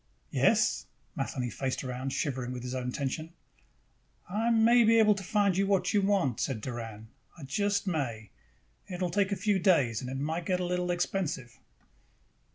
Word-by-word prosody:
"Yes?" -, -, +2 dB, 0.3 s
Matheny 125 Hz, -2 st, -3 dB
faced 130 Hz, +4 st, -3 dB
around, 130 Hz, +1 st, -4 dB
shivering 130 Hz, -4 st, -2 dB
with 125 Hz, -1 st, -6 dB
his 125 Hz, 0 st, -4 dB
own 125 Hz, -1 st, -2 dB
tension. 155 Hz, +5 st, -3 dB, 0.9 s
"I 215 Hz, +5 st, 0 dB
may 235 Hz, +1 st, +5 dB
be 230 Hz, +1 st, +5 dB
able 215 Hz, -1 st, +6 dB
to 195 Hz, -1 st, -6 dB
find 205 Hz, 0 st, +2 dB
the 190 Hz, +3 st, +1 dB
man 195 Hz, -1 st, +2 dB
you 205 Hz, -, +4 dB
want," 195 Hz, -, +1 dB
said 130 Hz, -5 st, -1 dB
Doran. 110 Hz, -2 st, -7 dB, 0.3 s
"I 160 Hz, -, -10 dB
just 200 Hz, +10 st, 0 dB
may. 125 Hz, -, -3 dB, 0.6 s
It 180 Hz, -2 st, -6 dB
will 180 Hz, -2 st, -1 dB
take 200 Hz, +2 st, +1 dB
a -, -, +1 dB
few 195 Hz, +1 st, +1 dB
days 145 Hz, -, +3 dB
and 130 Hz, +1 st, -4 dB
might 165 Hz, +2 st, -3 dB
get 180 Hz, -1 st, +1 dB
a 180 Hz, -, -1 dB
little 180 Hz, 0 st, -1 dB
expensive." 175 Hz, -8 st, -2 dB
170 Hz, 170 wpm, -30 LUFS, 130-195 Hz, 0.9 s, able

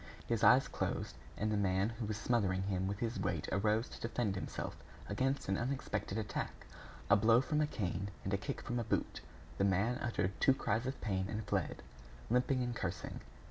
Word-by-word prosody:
His -, -, 0 dB
eyes -, -, +7 dB
closed, -, -, -2 dB, 0.2 s
and 110 Hz, +1 st, 0 dB
the 105 Hz, -, +2 dB
man 95 Hz, +1 st, +2 dB
who 115 Hz, -1 st, -4 dB
was 105 Hz, -1 st, -2 dB
smothering 100 Hz, -5 st, +1 dB
him 95 Hz, -1 st, 0 dB
with 100 Hz, +1 st, -2 dB
his 115 Hz, +1 st, -2 dB
weight -, -, -1 dB
arose 105 Hz, +4 st, +2 dB
to -, -, -10 dB
defend 115 Hz, -3 st, 0 dB
himself 95 Hz, -, -4 dB, 0.3 s
against 135 Hz, +2 st, 0 dB
an 95 Hz, 0 st, +1 dB
unexpected 125 Hz, -5 st, -2 dB
attack. 110 Hz, -2 st, -3 dB, 0.5 s
A -, -, +10 dB
blow 115 Hz, +3 st, +6 dB
from 150 Hz, +3 st, +1 dB
a 150 Hz, -, +3 dB
cane 100 Hz, -, -2 dB
and 95 Hz, -, -2 dB
a -, -, +4 dB
kick 140 Hz, +8 st, -4 dB
from 120 Hz, 0 st, -2 dB
a -, -, 0 dB
boot; 110 Hz, -, -1 dB, 0.4 s
the -, -, +4 dB
man 100 Hz, +6 st, +2 dB
uttered 110 Hz, -5 st, 0 dB
two 135 Hz, -, +6 dB
cries 115 Hz, 0 st, 0 dB
of 130 Hz, -, -3 dB
pain, 95 Hz, -3 st, 0 dB
and 105 Hz, 0 st, -3 dB
fled, 100 Hz, -6 st, -1 dB, 0.5 s
limping 125 Hz, +1 st, +3 dB
and 120 Hz, -1 st, -2 dB
cursing. 95 Hz, -5 st, -3 dB
110 Hz, 195 wpm, -35 LUFS, 95-120 Hz, 0.5 s, A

